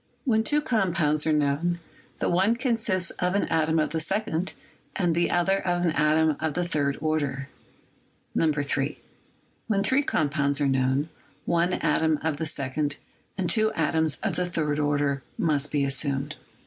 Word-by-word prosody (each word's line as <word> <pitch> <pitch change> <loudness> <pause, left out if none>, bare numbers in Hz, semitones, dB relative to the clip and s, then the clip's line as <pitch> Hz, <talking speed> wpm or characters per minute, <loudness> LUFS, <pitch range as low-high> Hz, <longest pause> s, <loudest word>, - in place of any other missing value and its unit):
When 220 -4 +2
two 295 +5 +2
compounds 170 - +1
are - - +3
known, 150 +4 +1 0.4
the - - -1
one 190 +6 +3
consists 225 -8 +1
of 180 +1 0
an 200 - +2
atom 160 0 +1
of 155 - +1
the 160 - -1
second 180 +1 -1 0.4
and 175 -3 +1
the 170 +1 +1
other 190 +3 +2
of 175 -1 0
an 165 - +2
atom 155 0 +2
of 160 -2 -2
the 175 - 0
third 145 -5 0
order. 145 -3 -2 0.9
3. 145 -2 0 0.7
When 200 -3 +1
three 260 +7 +3
compounds 145 - 0
are 145 - +2
known, 135 +3 +1 0.4
one 170 +1 +1
atom 160 -1 +1
of 160 -2 -1
the 160 +1 -2
second 145 +1 -1 0.4
and 190 -3 -1
two 220 +3 +3
atoms 160 -2 +1
of - - -1
the 180 - 0
third 150 -4 -1
order 145 -2 0 0.2
must 150 -3 0
be 145 -2 +1
assumed. 135 0 +1
160 Hz, 160 wpm, -26 LUFS, 145-175 Hz, 0.9 s, are